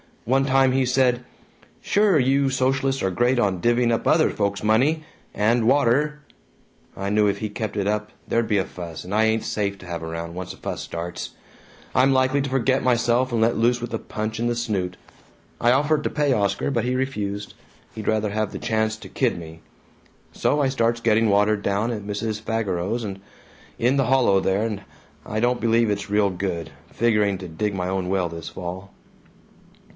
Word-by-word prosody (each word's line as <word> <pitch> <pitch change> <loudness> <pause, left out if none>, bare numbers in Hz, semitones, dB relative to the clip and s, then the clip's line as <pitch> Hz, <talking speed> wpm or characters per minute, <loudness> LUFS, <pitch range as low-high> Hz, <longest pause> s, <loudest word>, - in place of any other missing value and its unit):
One 135 +3 +2
time 135 -1 +4
he 130 0 +2
said, 125 -1 +2 0.6
'Sure, 205 -4 +3
you 135 +1 +3
socialists 135 +1 0
are 95 - +1
great 120 +7 +2
on 100 -6 +1
divvying 120 +2 +3
up 115 - 0
other - - +4
folks' 100 -1 -2
money 135 +9 +2 0.3
and 115 +2 +2
water!' 145 +3 +2 0.8
I 100 +1 -3
knew 105 0 +3
if 100 - 0
he 110 - -3
kept 105 0 -4
it 100 -2 -1
up 105 0 -1 0.2
there'd 115 -1 +1
be 105 -2 +2
a 95 - +1
fuss, 85 -3 -8
and 90 +3 -7
I 110 +1 +3
ain't 110 0 +1
safe 100 -2 -2
to 95 - -12
have 85 -1 -5
around, 85 +1 -5
once 90 0 -6
a - - -15
fuss - - -5
starts; 85 +1 -5 0.6
I'm 130 +2 +4
likely 130 +2 +2
to 135 - -3
forget 130 0 +1
myself 125 +1 +2
and 115 -1 0
let 115 +1 +2
loose 120 +2 +2
with 120 -1 -5
a 115 - -1
punch 110 +1 -4
in 120 - 0
the 120 - 0
snoot. 100 -6 -2 0.6
I 120 - +4
offered 150 +3 +2
to - - 0
pay 145 -2 +1
Oscar 100 +5 0
but 120 -3 0
he 125 +1 0
refused 105 -6 -3 0.4
he'd 110 -2 -7
rather 110 -1 +1
have 105 0 -2
the - - -6
chance 110 0 0
to - - -11
kid - - 0
me. 80 -1 -10 0.7
So 145 +1 +1
I 135 - +2
starts 115 -3 0
getting 115 -1 +3
water 105 +1 +3
down 100 +3 -1
at 105 -3 -4
Mrs. 105 +1 -3
Fageros's, 105 -1 -2 0.6
in 125 +4 +2
the 135 - +2
hollow 125 -6 +4
there, 95 +3 +1
and 105 -3 -3 0.4
I 110 - -3
don't 120 +2 +1
believe 115 -1 +3
it's 100 - -3
real 105 -1 +3
good. 90 -4 -3 0.2
Figuring 105 -4 +2
to 95 - -7
dig 100 +5 -2
my 90 -1 -2
own 95 -1 -2
well 90 -2 0
this 85 -1 -7
fall." 95 +2 -7
110 Hz, 195 wpm, -23 LUFS, 100-125 Hz, 0.8 s, time